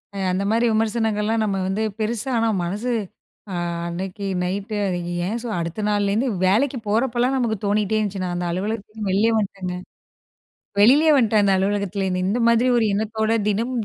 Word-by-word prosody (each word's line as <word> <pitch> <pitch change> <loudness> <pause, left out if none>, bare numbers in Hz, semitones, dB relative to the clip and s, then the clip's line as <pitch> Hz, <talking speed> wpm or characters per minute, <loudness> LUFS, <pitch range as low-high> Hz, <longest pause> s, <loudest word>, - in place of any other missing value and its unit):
அ - - -5
அந்த 185 +2 -1
மாரி 230 +2 +2
விமர்சனங்கள்லாம் 220 0 0
நம்ம 200 -2 -1
வந்து, 195 +3 -1 0.2
பெருசா 225 +3 -2
ஆனா 230 0 +2 0.2
மனசு 205 +8 -2 0.6
ஆ - - -4 0.3
அன்னைக்கு 185 +3 -5 0.2
நைட்டு, 200 +4 -3 0.5
ஏன் 225 +4 -2
சொ 240 - -4
அடுத்த 170 +5 -4
நாள்லேருந்து 205 +4 +1 0.2
வேலைக்கு 245 +8 +2
போறப்பலாம் 240 +4 +1
நமக்கு 230 -3 0
தோணிட்டே 210 +1 +1
இருந்துச்சு. 200 -3 -2
நான் 175 -1 -2
அந்த 175 0 -2
அலுவலகத்திலிருந்து 210 +2 -4
வெளிலயே 215 +4 +3
வன்ட்டேங்க! 195 -3 -3 1.1
வெளிலேயே 290 +9 +6
வன்ட்டேன் 220 -5 +3
அந்த 195 - +3
அலுவலகத்துல 200 0 -1
இருந்து! 185 -1 -1
இந்த 225 +5 0
மாதிரி 235 +2 +3
ஒரு 235 - +3
எண்ணத்தோட 220 +1 -1 0.2
தினமும் 230 +3 -1
215 Hz, 155 wpm, -22 LUFS, 195-230 Hz, 1.1 s, வெளிலேயே